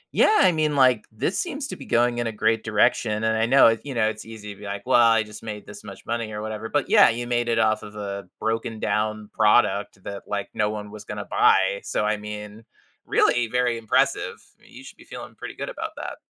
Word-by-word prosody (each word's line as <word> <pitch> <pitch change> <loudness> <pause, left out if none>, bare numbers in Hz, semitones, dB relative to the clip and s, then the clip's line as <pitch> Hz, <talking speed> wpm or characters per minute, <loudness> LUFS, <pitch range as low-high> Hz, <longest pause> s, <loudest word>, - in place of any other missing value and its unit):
Yeah. 430 - +5
I 185 - +6
mean, 155 -2 0
like, 130 -5 +4
this 110 - -2
seems 290 -5 -3
to - - -5
be - - -10
going 120 0 +2
in 120 - -1
a - - -2
great 110 +1 +1
direction, 110 0 +1
and 110 0 +1
I 110 - +2
know 135 0 +6
if 115 0 +2
you 140 - -5
know, 110 -1 +2
it's 110 0 -7
easy 105 -2 -9
to 100 - -18
be, 105 - -10
like, 100 0 -5
"Well, 125 -1 +4
I 115 -1 +4
just 105 0 -11
made 105 -2 -7
this - - -11
much - - -11
money 115 -2 -3
or 105 - -5
whatever." 110 0 -5
But, 145 +5 -1
yeah, 205 - +7
you 120 +1 -3
made 120 -1 0
it 115 -1 +1
off 110 -1 +2
of 105 0 -11
a 100 -2 -6
broken 115 0 -2
down 110 0 -2
product 105 -3 +2
that, 100 0 -7
like, 100 -1 -3
no 105 -1 0
one 105 -1 -6
was 105 0 -10
gonna - - -6
buy. 95 +1 +3
So, 105 - -1
I 105 0 +1
mean, 105 +1 -8 0.4
really 120 -1 +2
very 125 0 0
impressive. 110 -1 0 0.2
You - - -15
should - - -13
be - - -17
feeling - - -10
pretty - - -8
good - - -5
about - - -5
that. - - -6
110 Hz, 240 wpm, -24 LUFS, 105-120 Hz, 0.4 s, yeah